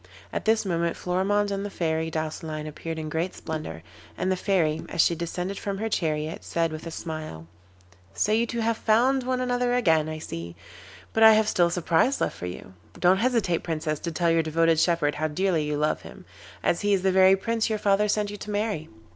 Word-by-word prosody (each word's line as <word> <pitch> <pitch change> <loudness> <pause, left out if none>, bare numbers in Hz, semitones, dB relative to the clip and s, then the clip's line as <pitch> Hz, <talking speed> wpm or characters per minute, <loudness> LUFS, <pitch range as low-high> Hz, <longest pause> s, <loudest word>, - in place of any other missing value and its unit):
At - - -3
this 220 -1 +2
moment 170 -2 -1
Florimond 200 +3 0
and 195 0 -2
the 205 - -4
Fairy 160 -3 -1
Douceline 155 -1 -4
appeared 160 +2 -6
in 155 -1 -4
great 160 +4 -2
splendour, 155 - -6 0.3
and 185 +1 0
the - - +2
Fairy, 170 -5 +1
as - - -6
she 170 - +5
descended 180 +3 -4
from 200 -1 -3
her 220 +2 -2
chariot, 155 -4 -2
said 165 -1 -1
with 155 +1 -7
a - - -3
smile: 155 - -6 0.7
'So 210 - +1
you 230 +2 +2
two 235 0 -3
have 225 0 +1
found 245 +5 +3
one 255 0 -1
another 245 -1 0
again, 160 -10 +2
I 155 - -4
see, 85 - -7 0.6
but 225 - 0
I 220 0 +9
have 215 0 +3
still 175 -4 +3
a - - -4
surprise 175 +9 +2
left - - -1
for 90 - -6
you. 90 +1 -8 0.3
Don't 185 +1 +4
hesitate, 220 -7 +1
Princess, 155 -2 -2
to 170 - -4
tell 170 0 +1
your 165 0 +3
devoted 165 0 +2
shepherd 165 -4 +2
how 155 +1 -1
dearly 165 0 0
you 150 0 -1
love 150 +1 0
him, - - -12 0.4
as 170 - +1
he 205 -1 +3
is 190 - -3
the 190 - +3
very 190 0 +6
Prince 225 +3 -1
your 215 - 0
father 205 0 +2
sent 210 0 0
you 205 - -7
to 210 - -9
marry. 205 -6 -2
175 Hz, 215 wpm, -26 LUFS, 160-205 Hz, 0.7 s, I